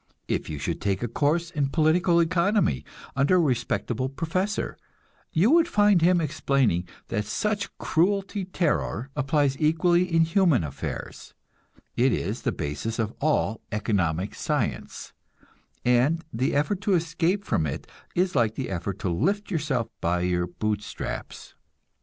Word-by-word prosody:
If - - -2
you 75 - -4
should 70 - -3
take 100 +1 0
a - - 0
course 155 +8 0
in 145 -4 0
political 170 +3 +3
economy 170 - +2 0.3
under 140 +7 +3
a - - +5
respectable 130 -3 0
professor, 180 +8 -2 0.6
you 185 - +3
would 335 0 +5
find 205 - +4
him 175 +1 +4
explaining 140 - +1 0.2
that 105 -3 -1
such 210 - -1
cruelty 195 +3 0
terror 150 - -1
applies 145 -1 +1
equally 175 +3 +3
in 165 0 +4
human 165 - +3
affairs; 70 -3 -6 0.6
it 125 +2 +3
is 105 +2 -2
the 125 - 0
basis 80 +6 -4
of 110 -1 -1
all 145 -7 +1
economic 100 -3 0
science, - - -3 0.7
and 130 +7 +3
the 130 +5 0
effort 180 +7 0
to 200 -2 +2
escape 170 +4 0
from 80 - +1
it 70 - -5 0.3
is 180 -1 +1
like 115 -4 +2
the 130 - -4
effort 95 +1 -3
to 95 - -1
lift 200 - 0
yourself 145 - 0
by 90 0 +1
your 90 0 0
boot 105 +4 -2
straps. - - -7
145 Hz, 145 wpm, -26 LUFS, 110-175 Hz, 0.7 s, a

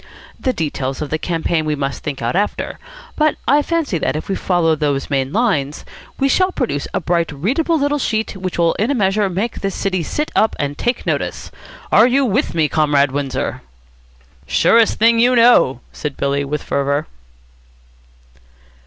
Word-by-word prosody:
The 260 - 0
details 140 - -3
of 150 - -7
the 155 - -1
campaign 165 -1 -1
we 155 -1 -1
must 140 -1 -3
think 140 -5 -5
out 120 - -1
after, 205 +2 -2 0.4
but 305 -1 +2
I 290 +2 +4
fancy 305 - -1
that, - - -1
if 155 - -5
we - - +1
follow 175 -4 +1
those 145 -2 -2
main 135 -1 0
lines, 155 - 0 0.3
we 275 - +3
shall 370 +7 +2
produce 145 - -2
a - - -1
bright, 170 -2 0
readable 270 - 0
little 290 0 0
sheet 220 -4 -1
which 185 -1 -5
will 170 -1 +3
in 220 +5 +1
a 285 - +1
measure 200 -2 +1
make 200 +6 -3
this 195 -1 -2
city 185 -2 -1
sit 300 - -3
up 220 - +2
and 145 0 -2
take 240 - -2
notice. - - -3 0.4
Are 225 - +6
you 270 +2 +2
with 245 - 0
me, 160 -2 +2
Comrade 145 -3 +2
Windsor?" 140 -1 -3 0.9
"Surest 230 -1 +3
thing 230 +1 +4
you 250 +2 +4
know," 230 - +5
said 150 -3 -5
Billy 140 0 0
with 145 +1 -3
fervour. 140 +2 -1
175 Hz, 175 wpm, -18 LUFS, 145-235 Hz, 0.9 s, Are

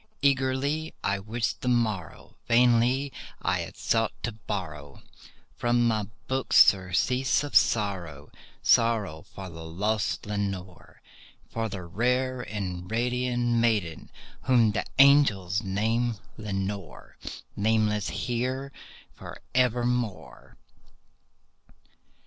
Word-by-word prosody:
Eagerly 140 +3 +1
I 100 0 0
wished 110 +3 -3
the - - -4
morrow;—vainly 120 - +1 0.3
I - - 0
had - - -6
sought 115 -1 +1
to 115 - -1
borrow 90 -10 -6 0.5
From 120 0 +2
my 110 -3 0 0.2
books 130 0 +5
surcease 100 +9 +2
of 145 - -6
sorrow—sorrow 100 +1 +1
for 95 +4 -10
the 80 -2 -9
lost 100 +6 -1
Lenore— 100 -3 -5 0.5
For 115 -1 -2
the 95 -2 -6
rare 125 +8 0
and 95 -5 -5
radiant 125 +1 0
maiden 105 -9 0 0.4
whom 120 -4 +4
the 105 - -2
angels 115 -9 +5
name 115 +4 0 0.2
Lenore— 100 - -5 0.4
Nameless 105 -1 +1
here 130 +3 -2 0.4
for - - -10
evermore. 125 -3 -1
110 Hz, 95 wpm, -27 LUFS, 95-125 Hz, 0.5 s, books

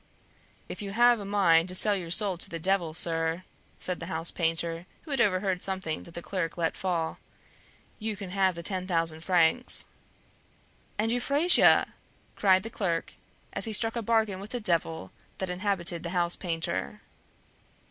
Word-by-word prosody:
"If - - -7
you 200 -1 -6
have 240 +1 +4
a 200 - -7
mind 185 -4 +3
to 185 - -1
sell 205 +2 +4
your 175 -4 -5
soul 195 +2 +2
to - - -3
the 165 - -5
Devil, 170 -2 +1
sir," 165 +1 0 0.3
said 180 -1 -4
the 165 - -7
house 165 -1 0
painter, 165 0 -1 0.2
who 310 - -10
had 270 -3 +1
overheard 185 -3 +1
something 190 -5 -3
that 170 - -14
the 170 - -6
clerk 180 -4 -3
let 165 -1 -1
fall, 170 -4 -2 0.8
"you 215 -1 -3
can 190 -2 -7
have 190 -2 +1
the 170 - -7
ten 185 0 -1
thousand 165 -3 0
francs." 175 +7 +3 1.1
"And 220 +2 0
Euphrasia!" 280 +8 +4 0.4
cried 190 -2 +3
the 225 - -7
clerk, 170 -7 -2 0.4
as - - -1
he 220 - -3
struck 225 +2 +2
a 235 - -2
bargain 220 -3 0
with 200 +2 -9
the 245 - -2
devil 165 -5 0 0.3
that 190 -1 -3
inhabited 180 -2 0
the 170 - -5
house 175 -1 +2
painter. 165 - -3
185 Hz, 170 wpm, -28 LUFS, 165-205 Hz, 1.1 s, have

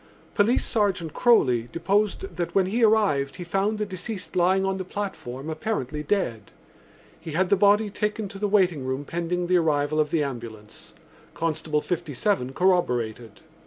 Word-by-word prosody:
Police 220 +4 +2
Sergeant 190 - 0
Croly 125 - +3
deposed 205 - 0
that 175 -1 -3
when 195 -1 +4
he 225 +6 0
arrived 205 -11 +3
he 180 - -6
found 195 +5 0
the 210 - -1
deceased 190 +1 -6
lying 185 +2 +3
on 195 0 -1
the - - -2
platform 175 -9 -6
apparently 155 - -3
dead. 140 - -2 0.7
He 160 -1 -8
had 185 +3 +1
the - - +5
body 205 +2 +3
taken 210 +1 -2
to 195 - -9
the 210 - 0
waiting 180 -8 +2
room 130 +2 -3
pending 175 +2 -2
the 180 +1 +3
arrival 155 -2 +1
of 150 -1 +2
the 155 -1 +1
ambulance. 115 -6 -8 0.4
Constable 155 -2 -1
57E 165 -3 -1
corroborated. 120 - 0
175 Hz, 160 wpm, -25 LUFS, 145-200 Hz, 0.7 s, the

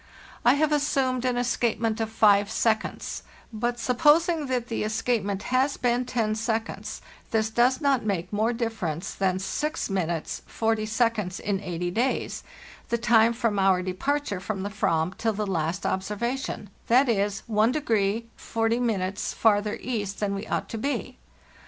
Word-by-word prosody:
I 245 +3 +6
have 305 +1 +2
assumed 265 -4 +1
an 250 -1 +1
escapement 235 -2 0
of 220 - -1
five 205 -2 +4
seconds; 220 -1 -1 0.3
but 240 +2 -1
supposing 300 +6 +3
that 250 -2 -1
the 225 - -2
escapement 215 -2 -1
has 265 +2 +2
been 245 0 +1
ten 225 -4 0
seconds, 225 +1 -3 0.3
this 220 -1 +1
does 245 +3 +3
not 280 -4 +2
make 185 -3 -2
more 215 +3 +2
difference 215 -8 -3
than 190 -1 0
6' 300 +12 -2
4o" 215 +4 -1
in 200 -2 -1
eighty 175 -2 -3
days 240 +7 -1 0.5
(the 235 - +1
time 230 -1 +4
from 230 -4 0
our 190 -1 +3
departure 205 +4 -1
from 190 0 -4
the 200 - -2
/vam 175 -3 0
till 225 -1 +1
the 210 +1 -2
last 175 -1 -2
ob 190 - +1
servation)—that 235 +3 -1
is, 205 -2 0
1 220 +1 +2
40 225 -3 0 1.1
farther 210 -1 +2
east 205 -5 -3
than 205 -1 0
we 200 +1 -4
ought - - -2
to 225 - -4
be. 280 +5 -3
220 Hz, 145 wpm, -26 LUFS, 200-245 Hz, 1.1 s, I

